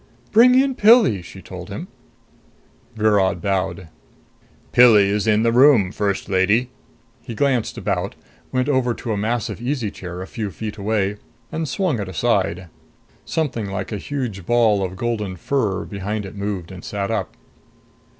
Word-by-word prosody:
"Bring 245 +3 +6
in 270 0 +2
Pilli," 215 - +5
she 85 - -12
told - - -9
him. - - -6 1.1
Virod 100 -4 +2
bowed. 95 -2 -2 0.8
"Pilli 110 -5 +6
is 105 +2 0
in 110 0 +3
the 115 - +3
room, 120 -6 +5
First 100 -2 -2
Lady." 100 +7 +2 0.5
He 115 - -8
glanced 130 -3 0
about, - - -2 0.4
went 130 +1 0
over 130 -4 +1
to 115 - -4
a - - -1
massive 110 +2 -2
easy 120 -4 -2
chair 90 0 -7
a - - -7
few 105 +1 -5
feet 105 +2 -7
way, 105 -1 0 0.3
and 160 -2 -3
swung 175 - 0
it 100 -2 -4
aside. 90 0 0 0.6
Something 120 -10 -2
like 95 - -4
a 105 - -2
huge 120 -5 -4
ball 110 -1 +3
of 95 0 -4
golden 105 -3 -2
fur 100 -2 -1
behind 100 +1 -4
it 95 - -8
moved 100 -3 -4
and 90 -1 -10
sat 100 0 -3
up. 110 - -3
105 Hz, 155 wpm, -21 LUFS, 100-125 Hz, 1.1 s, Bring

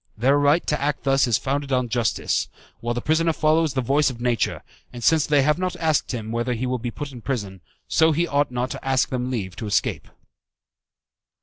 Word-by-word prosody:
Their 135 +6 +3
right 145 +4 +3
to 150 - -1
act 145 0 -1
thus 135 -1 +3
is 115 - +3
founded 140 +1 -2
on 125 -1 +1
justice, 120 -1 0 0.3
while 120 0 -2
the 120 - -3
prisoner 165 +1 +2
follows 155 -1 +2
the 130 - +1
voice 140 +4 +2
of 125 -3 -8
nature; 120 -1 -1 0.3
and 120 -1 -8
since 160 +4 +3
they 145 -2 +4
have 150 +4 +2
not 185 0 -2
asked 160 -2 0
him 110 -3 -5
whether 120 +2 -1
he 120 +3 -3
will 125 0 -1
be 120 +1 -3
put 140 +4 -6
in 125 -3 -10
prison, 100 -8 -4 0.3
so 160 0 +4
he 165 +3 +1
ought 145 -3 +1
not 125 +1 -2
to - - -7
ask 135 -1 +1
them 125 -1 -2
leave 100 -8 -4
to 110 - -5
escape. 105 - -1
130 Hz, 215 wpm, -23 LUFS, 120-150 Hz, 0.3 s, they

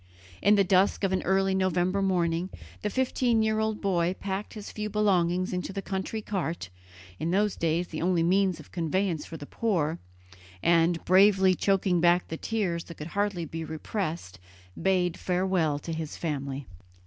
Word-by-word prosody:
In 205 +1 +5
the 200 - +4
dusk 190 +2 +2
of 195 - +2
an 190 - +1
early 195 +1 +2
November 185 0 +1
morning 175 -2 +1 0.3
the 210 - -1
fifteen 245 -1 +1
year 220 0 +1
old 220 -1 -1
boy 180 -2 +1
packed 195 +2 -4
his 210 -2 -7
few 210 0 -4
belongings 185 -4 +1
into 180 +1 -3
the 195 0 -4
country 195 +3 -3
cart, 170 - -3 0.5
in 160 - -1
those 205 +3 +1
days 170 +2 0
the 155 - -5
only 175 -1 +2
means 185 0 +2
of 155 - -14
conveyance 170 0 -1
for 165 - -7
the 145 - -8
poor, 170 -5 -1 0.6
and, 170 0 +3
bravely 190 0 +5
choking 185 -2 +1
back 175 +1 +3
the 160 - -3
tears 185 -7 -2
that 170 - -10
could 150 +2 -7
hardly 200 -4 0
be 160 +1 -5
repressed, 160 - -4 0.4
bade 180 -2 +1
farewell 180 -5 +1
to 165 +3 -5
his 160 -1 -5
family. 140 -4 -3
185 Hz, 170 wpm, -28 LUFS, 165-195 Hz, 0.6 s, In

